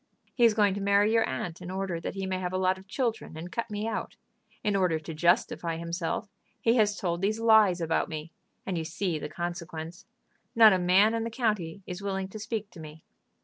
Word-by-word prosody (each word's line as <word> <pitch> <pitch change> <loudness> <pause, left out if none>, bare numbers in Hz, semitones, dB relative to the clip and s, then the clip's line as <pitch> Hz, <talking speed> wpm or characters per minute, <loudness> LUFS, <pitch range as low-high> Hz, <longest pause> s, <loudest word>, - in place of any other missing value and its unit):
He 240 - +4
is 225 -2 +4
going 205 -3 +3
to 200 - -4
marry 200 +2 +3
your 225 -1 +3
aunt 165 +6 -4
in 180 - -7
order 190 -2 -3
that 165 - -5
he 195 -1 -3
may 190 -1 -2
have 180 0 -3
a - - +1
lot 185 0 +1
of 190 - -17
children, 225 - -2
and 170 +3 -7
cut 230 0 -3
me 210 +1 -3
out. 225 - -4 0.5
In 210 -3 +1
order 180 -4 +2
to 160 +1 -7
justify 170 0 +1
himself, 170 +5 -3 0.3
he 230 +1 +3
has 210 -2 +3
told 175 -2 -2
these 215 +3 0
lies 220 -5 +5
about 165 -1 0
me, 155 +1 -6 0.3
and 180 -3 -2
you - - -3
see 170 0 -2
the 150 - -5
consequence; 170 0 -6 0.5
not 220 -2 +8
a 185 - +2
man 190 +5 +4
in 230 0 -1
the 230 - -3
county 210 -7 -2
is 180 +1 -6
willing 195 -1 -3
to 215 - -8
speak 215 -1 -4
to - - -13
me." 155 0 -11
190 Hz, 225 wpm, -28 LUFS, 170-210 Hz, 0.5 s, not